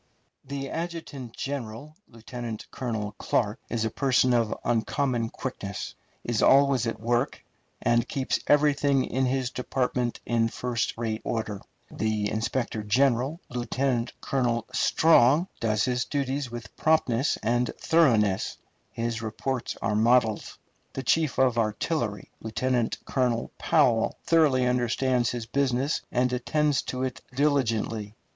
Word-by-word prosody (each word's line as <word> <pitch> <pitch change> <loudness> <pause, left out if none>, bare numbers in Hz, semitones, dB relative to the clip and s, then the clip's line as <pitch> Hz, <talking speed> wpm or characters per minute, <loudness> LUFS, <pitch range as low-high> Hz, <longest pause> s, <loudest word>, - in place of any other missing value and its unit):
The 135 0 -5
adjutant 160 -8 -5
general, 140 +1 -5
Lieutenant 115 -1 -7
Colonel 110 -5 -3
Clark, 105 -1 0
is 115 -2 -1
a 110 - -1
person 130 -1 +2
of 115 -3 +2
uncommon 120 +1 0
quickness, 100 -7 -5 0.3
is 120 -3 -1
always 135 -3 +5
at 115 - -3
work, 120 +4 -1 0.4
and 120 +1 +2
keeps 135 -3 -1
everything 145 -2 +3
in 130 0 0
his 130 -1 -1
department 125 -1 -1
in 115 -1 +2
first 120 0 -2
rate 110 -1 -2
order. 110 -3 -3 0.3
The 110 -1 -1
inspector 115 +1 -2
general, 130 - +1
Lieutenant 125 0 -1
Colonel 120 -4 0
Strong, 160 +1 +4
does 110 -2 +1
his 125 -1 0
duties 140 -1 -2
with 120 -3 -8
promptness 145 -5 +2
and 120 +2 +1
thoroughness; 115 - +2 0.3
his 115 0 -3
reports 120 +3 -3
are 105 - +1
models. 115 -1 +2 0.4
The 135 - -4
chief 155 +3 +1
of 125 -3 +3
artillery, 110 - -2
Lieutenant 120 +2 0
Colonel 125 -3 0
Powell, 115 -3 +3
thoroughly 150 -6 +4
understands 125 0 +1
his 120 -2 -4
business, 135 +2 0
and 125 0 +1
attends 145 +3 +1
to 130 0 -4
it 130 -2 -3
diligently. 115 -7 0
125 Hz, 125 wpm, -27 LUFS, 115-135 Hz, 0.4 s, always